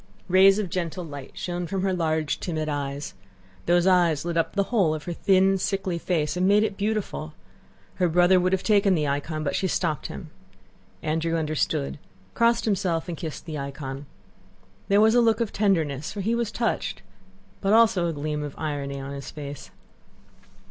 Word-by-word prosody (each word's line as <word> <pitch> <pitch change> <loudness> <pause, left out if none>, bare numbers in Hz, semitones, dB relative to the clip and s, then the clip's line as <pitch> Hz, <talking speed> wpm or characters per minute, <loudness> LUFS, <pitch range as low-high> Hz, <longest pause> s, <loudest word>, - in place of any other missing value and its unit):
Rays 190 +1 +6
of 200 -5 -2
gentle 175 0 -3
light 145 -3 -9
shone 175 -1 -3
from 190 +2 -2
her 190 -1 +1
large, 160 -3 0
timid 155 -3 -3
eyes. 145 -1 -3 0.5
Those 175 +1 +4
eyes 175 -5 +3
lit 170 -1 -2
up 165 +3 0
the 200 - +3
whole 180 -9 +3
of 155 - -7
her 175 - -4
thin, 190 +1 +3
sickly 190 -2 -1
face 155 -3 -1
and 180 +1 +1
made 205 +2 +5
it 210 -2 -1
beautiful. 205 -7 -3 0.7
Her 180 - +4
brother 180 +2 +5
would 180 +1 +1
have 190 -1 0
taken 200 -3 +4
the 150 -3 0
icon, 150 +2 -2
but 140 - -1
she 190 - 0
stopped 165 -5 -1
him. 160 -5 -9 0.7
Andrew 160 +2 0
understood, 155 -2 -1 0.3
crossed 235 0 +2
himself 180 -6 0
and 175 - -4
kissed 160 -2 -6
the 155 -3 -5
icon. 140 0 -6 0.8
There 200 +1 +4
was 220 +1 +5
a 245 - +5
look 225 -1 +3
of 230 -3 -2
tenderness, 160 -9 0
for 205 - -5
he 220 +5 0
was 235 -2 -1
touched, 230 0 -2 0.6
but 195 - +1
also 210 -6 +4
a 165 - -2
gleam 150 0 -3
of 145 -2 -6
irony 140 -3 -3
on 135 +1 -6
his 140 -2 -7
face. 145 -2 -8
170 Hz, 185 wpm, -25 LUFS, 150-195 Hz, 0.8 s, Rays